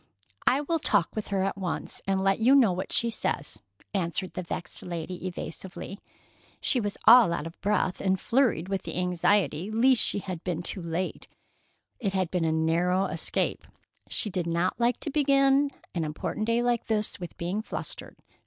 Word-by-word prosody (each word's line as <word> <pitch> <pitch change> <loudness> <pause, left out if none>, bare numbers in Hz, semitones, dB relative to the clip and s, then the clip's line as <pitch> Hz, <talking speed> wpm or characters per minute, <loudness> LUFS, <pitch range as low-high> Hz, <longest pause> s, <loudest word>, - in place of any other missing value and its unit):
"I 270 +3 +4
will 330 +3 0
talk 170 - +2
with 215 -1 -3
her 195 -2 0
at 195 0 -2
once, 180 -4 -3
and 190 0 +1
let 195 +1 +2
you 250 +5 +5
know 245 -8 +6
what 180 +1 -4
she 235 0 +2
says," 220 - -2 0.3
answered 185 -1 -2
the - - -3
vexed 180 0 -4
lady 175 +1 -5
evasively. 185 +3 -6 0.6
She 255 - +1
was 205 -2 -3
all 230 -4 +8
out 150 - -2
of 165 - -9
breath 205 -2 0
and 190 -1 +1
flurried 230 -9 +1
with 195 0 -2
the - - -6
anxiety 180 -1 +1
lest 240 +3 +4
she - - +2
had 185 -4 -5
been 175 -2 -2
too 185 - 0
late. 170 +2 -3 0.7
It 200 -5 -1
had 185 -3 0
been 180 -3 0
a 160 - +2
narrow 170 +4 +2
escape. 165 -4 -1 0.4
She 210 - 0
did 180 -2 -2
not 170 +6 0
like 235 0 +2
to 300 - -3
begin 275 -1 +4 0.2
an 170 - -1
important 155 +7 -3
day 230 +1 +2
like 240 -1 +1
this 215 -1 -1
with 175 -1 -8
being 180 +5 -2
flustered. - - -6
190 Hz, 180 wpm, -27 LUFS, 175-230 Hz, 0.7 s, all